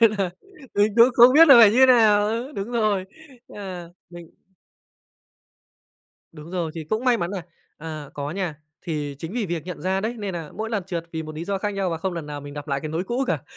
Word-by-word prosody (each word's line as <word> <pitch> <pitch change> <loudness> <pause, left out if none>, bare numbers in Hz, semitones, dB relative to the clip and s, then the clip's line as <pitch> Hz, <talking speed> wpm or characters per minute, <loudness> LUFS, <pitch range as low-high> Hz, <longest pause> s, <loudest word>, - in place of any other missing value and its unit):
Nên 230 -2 +6
là 190 -2 0 0.4
mình 205 0 +2
cũng 235 +1 +8
không 245 +2 +7
biết 325 +2 +7
là 275 - +10
phải 210 -3 +8
như 235 - +1
thế 260 - +8
nào. 215 -5 +5
Ừ, 235 +6 -3
đúng 200 +1 -5
rồi, 215 -5 +1 0.4
à, 185 -4 -8 0.2
mình 170 -1 -12 2.0
Đúng 155 +1 -12
rồi, 175 -3 -2
thì 160 -2 -6
cũng 215 +10 -2
may 245 -2 +4
mắn 175 -3 -3
nà 195 -4 -5 0.3
à, 155 -2 -8
có 145 0 -4
nha, 175 -2 -3 0.3
thì 150 -4 -4
chính 165 +5 -7
vì 230 -4 -2
việc 170 -3 -4
nhận 180 - -7
ra 190 +1 0
đấy, 220 +4 -3
nên 200 -3 -4
nà 165 -3 -6
mỗi 220 +1 -4
lần 205 -4 -1
trượt 170 -3 -4
vì 160 - -3
một 155 0 -9
lý 160 - -5
do 195 +1 -2
khác 205 +2 -2
nhau 195 -3 -1
và 165 - -3
không 185 +1 -3
lần 165 -3 -6
nào 145 -1 -6
mình 145 0 -10
gặp 145 +1 -8
lại 140 0 -1
cái 155 - -5
nỗi 165 +4 -3
cũ 245 +6 -1
cả. - - -1
185 Hz, 245 wpm, -23 LUFS, 160-215 Hz, 2.0 s, là